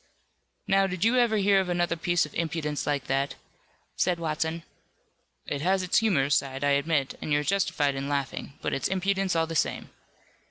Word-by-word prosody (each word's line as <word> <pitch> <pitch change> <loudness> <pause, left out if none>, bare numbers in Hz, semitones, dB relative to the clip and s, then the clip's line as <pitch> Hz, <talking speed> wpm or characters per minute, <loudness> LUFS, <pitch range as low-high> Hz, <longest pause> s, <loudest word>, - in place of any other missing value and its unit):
"Now, 195 0 +3
did 185 +1 -2
you 240 +3 +3
ever 235 -3 +3
hear 200 -1 +4
of 190 -2 -1
another 175 -1 0
piece 175 0 +1
of 150 - -12
impudence 155 -3 -2
like 145 -2 0
that?" 135 +1 -1 0.6
said 180 -1 +1
Watson. 160 0 -2 0.8
"It 140 - -3
has 185 +3 +1
its 180 - +3
humorous 150 -11 +2
side, 135 0 -3
I 145 - +3
admit, 140 -1 +1
and - - -4
you're 145 0 +2
justified 150 -5 +1
in 135 +1 -4
laughing, 140 0 -3
but - - -1
it's 135 - 0
impudence 190 -1 0
all 165 0 +2
the 165 - -6
same." - - -1
165 Hz, 185 wpm, -27 LUFS, 145-190 Hz, 0.8 s, hear